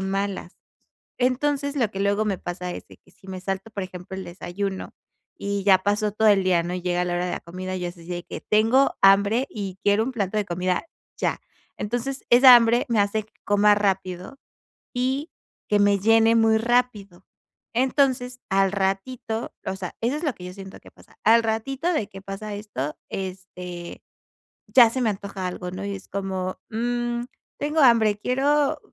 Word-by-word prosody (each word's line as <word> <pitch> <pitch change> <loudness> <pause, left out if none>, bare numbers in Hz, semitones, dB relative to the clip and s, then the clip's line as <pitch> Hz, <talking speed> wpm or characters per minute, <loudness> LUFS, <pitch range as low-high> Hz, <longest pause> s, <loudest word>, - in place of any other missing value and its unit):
malas. 195 -1 -3 0.6
Entonces, 285 +3 0
lo 235 -6 +1
que 195 - -5
luego 200 +2 +1
me 200 -3 -1
pasa 180 0 -5
es - - -8
de - - -15
que - - -26
si 190 - -18
me 185 -1 -6
salto, 195 +3 -4
por 205 -2 -4
ejemplo, 185 +1 -9
el 190 - -6
desayuno, 190 +2 -5 0.4
y 200 0 -3
ya 190 -2 +6
pasó 205 +2 0
todo 220 +1 +3
el 200 -2 +5
día, 180 -2 +3
¿no?, 175 +1 -3
llega 180 0 -1
la 175 0 -2
hora 175 +1 -1
de 180 - -3
la - - -3
comida, 185 +2 -6
yo 180 -1 -3
así 175 -1 -11
de 175 -1 -5
que: - - -7
"Tengo 225 +6 +3
hambre 200 +6 +5
y 195 -3 -6
quiero 205 +2 +4
un 260 - -4
plato 205 -3 -2
de 210 - +1
comida 180 - -1 0.3
ya". - - -1 0.4
Entonces, 245 +5 -3
esa 250 +1 +10
hambre 235 +1 +3
me 230 -2 +1
hace 205 +2 +1
que 220 - -32
coma 205 0 +4
rápido 190 +3 -2 0.6
y 265 +5 -1 0.4
que 210 - +3
me 205 0 +4
llene 225 +2 +5
muy 225 -1 +4
rápido. 220 -6 0 0.5
Entonces, 255 -1 +1
al 195 0 +2
ratito 205 +4 -2
o 190 - -2
sea, 185 -2 -6
eso 240 +5 0
es 315 - -5
lo 285 -6 0
que 180 - -11
yo 180 - -8
siento 190 -1 -10
que - - -16
pasa, - - -22
al 230 +2 +6
ratito 265 +9 -1
de 225 - -1
que 195 0 -11
pasa 200 +2 -6
esto, 205 -9 -5
este, 180 -2 -7 0.7
ya 240 -3 +7
se 260 +3 -3
me 230 - +2
antoja 195 -2 -4
algo, 180 0 -5
¿no? 190 +2 -6
Y 200 - -3
es 190 - -11
como, 190 -1 -3
mm, 240 +1 -2 0.3
tengo 300 +2 -1
hambre, 225 -5 +5
quiero 280 +5 +1
205 Hz, 185 wpm, -24 LUFS, 190-240 Hz, 0.7 s, esa